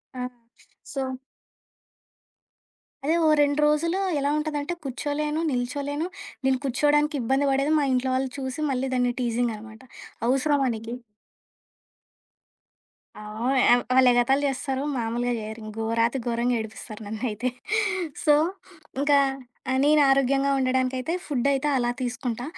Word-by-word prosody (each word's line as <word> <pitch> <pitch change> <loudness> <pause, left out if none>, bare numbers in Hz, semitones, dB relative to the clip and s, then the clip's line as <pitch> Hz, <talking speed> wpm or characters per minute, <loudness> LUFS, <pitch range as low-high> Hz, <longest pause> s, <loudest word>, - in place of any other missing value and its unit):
ఆ! 250 - -4 0.7
సో 265 -2 -2 1.9
అదే 320 +3 +2
ఓ - - +5
రెండ్రోజులు 300 +5 +2 0.2
ఎలా 280 0 0
ఉంటదంటే 300 +1 -2
కూర్చోలేను, 295 +3 -2
నిల్చోలేను. 280 +5 -2 0.4
నేను 265 -1 +3
కూర్చోవడానికి 295 +3 +2
ఇబ్బంది 270 +4 +1
బడేది 275 +3 +2
మా 290 - +1
ఇంట్లో 255 +1 +1
వాళ్ళు 260 0 0
చూసి, 260 +1 -4
మళ్ళీ 265 0 -1
దాన్ని 245 -1 +2
టీజింగనమాట 225 -2 -2 0.5
"అవసరమా 270 +2 +2
నీకి" 225 +1 -7 2.3
ఆ! - - -9 0.3
ఓహ్! 255 -2 +4
వాళ్ళేగతాలు 255 +1 +4
జేస్తారు. 270 0 -2
మాములుగా 240 +1 -1
జేయరు. 220 +1 -7 0.2
గోరాతి 230 +3 +1
గోరంగా 240 +1 +1
ఏడిపిస్తారు 220 0 -8
నన్నైతే. 220 +3 -2 0.8
సో, 300 - +6 0.7
ఇంకా 285 0 +4 0.5
ఆ - - +1
నేనరోగ్యంగా 275 -2 +4
ఉండడానికైతే 260 +2 0
ఫుడ్డయితే 280 +1 0
అలా 240 -2 +1
తీసుకుంటా. 245 -1 -3
260 Hz, 105 wpm, -25 LUFS, 245-285 Hz, 2.3 s, సో